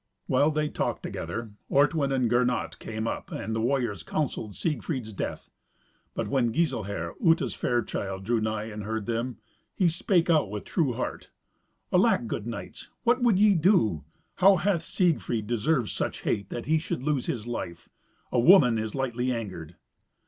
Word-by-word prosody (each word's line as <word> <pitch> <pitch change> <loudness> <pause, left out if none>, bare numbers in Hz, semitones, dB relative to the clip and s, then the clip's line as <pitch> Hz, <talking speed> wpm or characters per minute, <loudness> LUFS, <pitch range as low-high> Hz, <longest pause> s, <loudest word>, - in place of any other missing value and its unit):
While 145 - +3
they 155 0 0
talked - - -2
together, 110 +7 -5 0.2
Ortwin 140 0 +3
and 130 -3 +2
Gernot 125 +1 0
came 110 0 -4
up, - - -4
and 110 - -3
the 110 - 0
warriors 120 -6 0
counselled 115 - -3
Siegfried's 135 -8 -3
death. - - -5 0.6
But - - -2
when 125 -4 +1
Giselher, 110 - -1
Uta's 165 0 +3
fair 120 -1 0
child, 95 -1 -4
drew 115 +2 +1
nigh 110 -1 -1
and 105 -1 -6
heard 110 0 -3
them, 115 +1 -2 0.4
he 180 -3 +3
spake 175 +1 +1
out 155 - +3
with 105 0 -5
true 150 -9 0
heart, 125 - -4 0.6
"Alack, 120 - +4
good 110 -1 -4
knights, 120 - -7 0.2
what 245 +1 +3
would 235 -6 +4
ye 210 +1 +6
do? 150 - +3 0.3
How 195 +1 +7
hath 175 -1 +1
Siegfried 165 - 0
deserved 120 +2 +1
such - - -3
hate 100 -3 -1
that 120 - -5
he 160 +2 +3
should 150 -5 -4
lose 145 -3 0
his 115 -3 -2
life? 85 -8 -5 0.4
A - - +2
woman 125 - +6
is 110 0 -4
lightly 130 -1 -1
angered." 90 -9 -5
120 Hz, 165 wpm, -27 LUFS, 110-155 Hz, 0.6 s, How